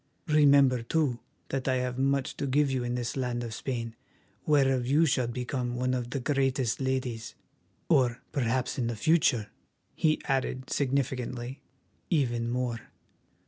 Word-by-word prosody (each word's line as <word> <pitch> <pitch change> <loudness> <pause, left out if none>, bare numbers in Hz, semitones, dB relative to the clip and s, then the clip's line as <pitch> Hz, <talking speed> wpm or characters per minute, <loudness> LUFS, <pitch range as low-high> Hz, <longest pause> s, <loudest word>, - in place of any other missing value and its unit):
Remember, 140 -4 +5
too, 130 0 0 0.3
that 135 -1 -2
I 130 - +2
have 125 0 -2
much 135 0 +1
to 140 - -2
give 140 +1 +2
you 130 -2 -1
in 120 0 -2
this 120 -1 -3
land 125 -2 -2
of 115 -2 -5
Spain, 115 -1 -4 0.5
whereof 135 -4 +3
you 150 +5 +4
shall 130 -5 +1
become 125 0 -3
one 130 +1 0
of 125 -2 -2
the 135 - -2
greatest 135 -2 0
ladies, 130 -4 -2 0.5
or 125 -2 +3
perhaps 130 -1 -1
in 120 - 0
the 120 - -2
future," 125 -5 +2 0.4
he 155 -1 +2
added 130 -1 -1
significantly, 130 -2 -2 0.5
"even 120 -8 +1
more. 120 -1 -1
130 Hz, 145 wpm, -29 LUFS, 120-135 Hz, 0.5 s, Remember